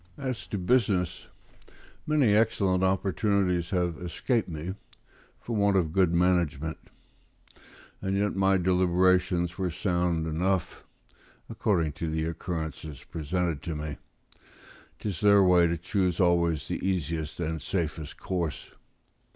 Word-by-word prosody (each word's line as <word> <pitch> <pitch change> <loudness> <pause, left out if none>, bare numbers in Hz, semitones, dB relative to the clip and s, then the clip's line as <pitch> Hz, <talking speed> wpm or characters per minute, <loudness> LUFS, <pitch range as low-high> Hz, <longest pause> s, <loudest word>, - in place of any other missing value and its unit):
As 130 -4 -4
to 105 - -3
business, 95 -4 +1 0.8
many 145 -8 +3
excellent 100 -4 +2
opportunities 95 -2 +1
have 90 -3 -1
escaped 105 +6 -1
me 80 +3 -5 0.7
for 115 - -5
want 100 -1 +3
of 80 -4 0
good 95 -3 +3
management; 85 -4 +1 1.2
and 95 0 -1
yet 100 0 0
my 95 0 +3
deliberations 90 0 +2
were 95 -1 0
sound 85 -1 0
enough, 90 +3 -1 0.7
according 85 -7 +1
to 80 +3 -4
the 80 0 -1
occurrences 80 -2 -5
presented 80 -1 -2
to 80 - -4
me: 75 -1 -5 1.0
'tis 100 -7 -4
their 100 -1 +6
way 90 -2 +5
to 85 0 -1
choose 90 0 -1
always 85 -5 +2
the - - -4
easiest 80 -4 -2
and 80 -2 -2
safest 80 -2 -3
course. 85 -5 -3
90 Hz, 120 wpm, -28 LUFS, 80-95 Hz, 1.2 s, their